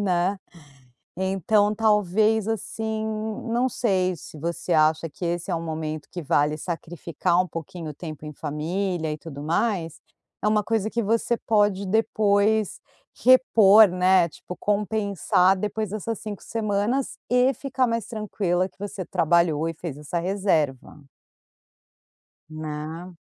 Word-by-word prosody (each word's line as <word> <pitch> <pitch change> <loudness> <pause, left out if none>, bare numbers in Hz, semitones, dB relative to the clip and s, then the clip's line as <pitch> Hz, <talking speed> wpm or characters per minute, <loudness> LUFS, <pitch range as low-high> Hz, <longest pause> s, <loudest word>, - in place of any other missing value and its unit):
né? 185 0 +1 0.8
Então, 195 +3 +2
talvez, 215 0 +2
assim, 220 0 -3 0.4
não 240 +2 +1
sei 185 -7 0
se 155 - -11
você 170 +2 -2
acha 155 +1 +3
que 175 - -7
esse 175 +2 -2
é 170 - +1
um 165 - -4
momento 155 -2 -4
que 175 - -5
vale 150 0 +1
sacrificar 170 +1 -1
um 185 - -4
pouquinho 165 -1 -7
o - - -13
tempo 155 -1 -8
em 150 - -7
família 160 +3 -2
e 150 - -6
tudo 145 -4 -9
mais. 165 -1 -1 0.4
É - - +2
uma 210 0 +2
coisa 220 0 0
que 235 - 0
você 230 +3 +1
pode 205 -2 +1
depois 215 0 +2 0.4
repor, 220 -5 +7
né, 180 -1 +3
tipo, 180 - -10
compensar 200 -2 +1
depois 210 +1 -3
essas 215 +1 -4
5 210 -2 -7
semanas 220 +4 -1
e 250 +1 +4
ficar 260 -2 -1
mais 230 -2 -1
tranquila 195 -5 -1
que - - -35
você 200 -2 -5
trabalhou 165 -2 +2
e 165 - -3
fez 155 -3 -7
essa 160 +4 -3
reserva. 165 -7 -1 1.5
Né? 155 +3 -6
190 Hz, 135 wpm, -24 LUFS, 165-215 Hz, 1.5 s, repor